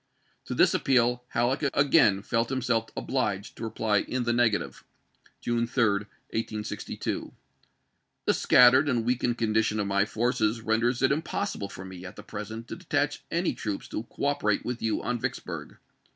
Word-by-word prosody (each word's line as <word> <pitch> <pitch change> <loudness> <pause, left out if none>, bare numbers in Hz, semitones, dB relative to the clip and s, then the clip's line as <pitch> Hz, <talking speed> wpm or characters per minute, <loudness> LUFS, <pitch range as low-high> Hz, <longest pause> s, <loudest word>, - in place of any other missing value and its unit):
To - - -4
this - - +5
appeal 125 -2 +2
Halleck 125 +3 0
again 135 -9 +4
felt 115 +1 0
himself 125 -4 0
obliged 105 -6 -2
to - - -7
reply 110 -2 +1
in 125 +5 -2
the 120 0 +1
negative, 120 -3 +1 0.6
July 120 0 0
3, 120 0 +1 0.5
1862: 110 -1 -4 0.5
" - - -49
The - - +4
scattered 130 +4 +6
and 120 -4 0
weakened 120 -1 0
condition 110 -1 +1
of 105 - 0
my 100 0 +2
forces 115 0 0
renders 120 +3 +1
it 130 - +4
impossible 155 - -2
for 95 -1 -9
me, 95 -1 -9
at 90 - -9
the 105 - -10
present, 110 +2 -7
to - - -4
detach 145 -5 -1
any 170 +2 0
troops 105 -3 -4
to - - -3
cooperate 130 -3 -1
with 125 -1 -3
you 110 -1 -1
on 125 -1 -1
Vicksburg. - - -5
115 Hz, 160 wpm, -27 LUFS, 110-125 Hz, 0.6 s, scattered